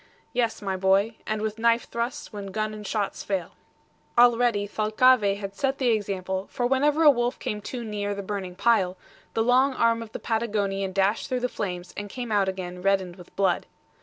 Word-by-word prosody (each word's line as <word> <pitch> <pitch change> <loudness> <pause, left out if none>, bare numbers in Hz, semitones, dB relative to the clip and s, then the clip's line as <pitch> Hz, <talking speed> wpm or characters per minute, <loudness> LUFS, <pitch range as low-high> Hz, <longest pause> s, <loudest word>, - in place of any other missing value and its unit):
"Yes, 235 -3 0
my 195 -1 -1
boy, 195 +4 +2
and 215 0 -1
with 220 0 -3
knife 230 +1 +3
thrusts, 235 0 -4
when 200 -1 -6
gun 215 +2 -2
and 210 -1 -7
shots 205 -3 -2
fail." 190 -4 -2 0.7
Already 240 -3 +4
Thalcave 215 0 +3
had 195 -1 -6
set 270 +5 -1
the 255 -3 +1
example, 190 -3 -1
for 245 - -2
whenever 290 +5 +3
a 300 - +9
wolf 240 -1 -1
came 210 -5 -4
too 240 +3 -5
near 205 -2 -3
the 200 - -5
burning 190 -2 -4
pile, 190 -3 +2 0.4
the 225 - +2
long 260 +3 +3
arm 230 -1 +2
of 225 -1 -8
the - - -5
Patagonian 205 -4 -1
dashed 195 +3 +1
through 255 -1 -1
the 250 - +1
flames 180 -6 -5
and 205 0 -5
came 245 +1 -5
out 200 -2 +3
again 180 -1 -6
reddened 190 -2 +1
with 180 -2 -15
blood. 195 -1 +1
210 Hz, 195 wpm, -26 LUFS, 195-235 Hz, 0.7 s, a